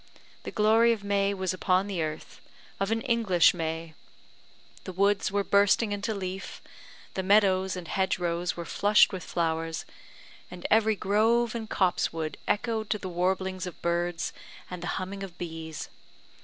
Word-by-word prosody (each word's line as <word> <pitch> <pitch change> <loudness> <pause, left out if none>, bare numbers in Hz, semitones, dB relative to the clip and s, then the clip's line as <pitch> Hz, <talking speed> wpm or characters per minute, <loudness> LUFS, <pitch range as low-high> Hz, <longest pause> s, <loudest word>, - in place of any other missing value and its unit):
The - - -3
glory 225 +2 +4
of 210 -3 -6
May 200 0 +1
was 190 -2 -2
upon 185 +1 +1
the 195 -4 -3
earth 155 0 -5 0.4
of 195 0 0
an 225 0 0
English 220 -8 +3
May. 165 -1 -4 0.9
The - - -5
woods 200 +2 +2
were 200 0 +1
bursting 200 +2 +3
into 205 +2 -2
leaf, 190 0 -5 0.5
the 190 - -2
meadows 190 -1 +3
and 180 -2 -7
hedge 190 +1 0
rows 175 0 -2
were 170 - -5
flushed 205 +3 +4
with 185 -3 -5
flowers, 165 -1 -2 0.6
and 180 -1 -10
every 220 0 +4
grove 225 +4 +2
and 225 -2 -5
copsewood 165 -4 0
echoed 220 0 -1
to 215 - +1
the 190 -2 -6
warblings 185 +1 -1
of 180 - -9
birds 170 0 -1 0.4
and 180 -1 -6
the 175 - -4
humming 190 +1 -5
of 185 -3 -8
bees. 160 -2 -6
190 Hz, 155 wpm, -28 LUFS, 175-205 Hz, 0.9 s, glory